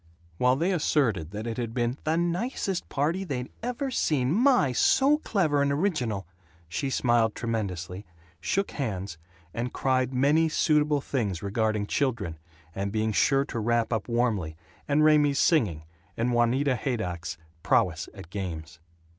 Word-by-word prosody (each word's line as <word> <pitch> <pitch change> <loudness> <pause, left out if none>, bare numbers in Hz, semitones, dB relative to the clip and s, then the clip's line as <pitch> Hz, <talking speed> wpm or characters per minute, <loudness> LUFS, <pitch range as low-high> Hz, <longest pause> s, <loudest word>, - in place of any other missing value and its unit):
While 125 +1 +4
they 170 +7 0
asserted 130 - +1
that 105 +3 -6
it 115 -1 -4
had 115 -1 -4
been 120 0 0
"the 160 +1 +1
nicest 180 +2 -2
party 160 +7 0
they'd 130 -8 -4
ever 250 +3 -3
seen 135 - +1
my! 240 - +4
so 275 - +4
clever 160 - +1
and 140 0 +2
original," 140 - -1 0.4
she 135 - -2
smiled 120 -4 +2
tremendously, 100 -5 -4 0.3
shook 195 - -1
hands, 100 - -4 0.3
and 120 +1 -3
cried 130 -1 +1
many 145 +5 +3
suitable 150 -2 +2
things 105 -11 -2
regarding 105 +1 0
children, 105 - -1 0.3
and 100 +1 -3
being 110 +1 0
sure 135 +6 +3
to 120 -5 -4
wrap 120 +1 +1
up 110 -2 -2
warmly, 115 -10 0 0.3
and 150 +1 +3
Raymie's 150 -2 +4
singing 105 - +2 0.3
and 120 +2 0
Juanita 125 +3 +2
Haydock's 90 - -3 0.2
prowess - - +1
at 85 - -11
games. 85 -5 -6
125 Hz, 145 wpm, -27 LUFS, 105-150 Hz, 0.4 s, While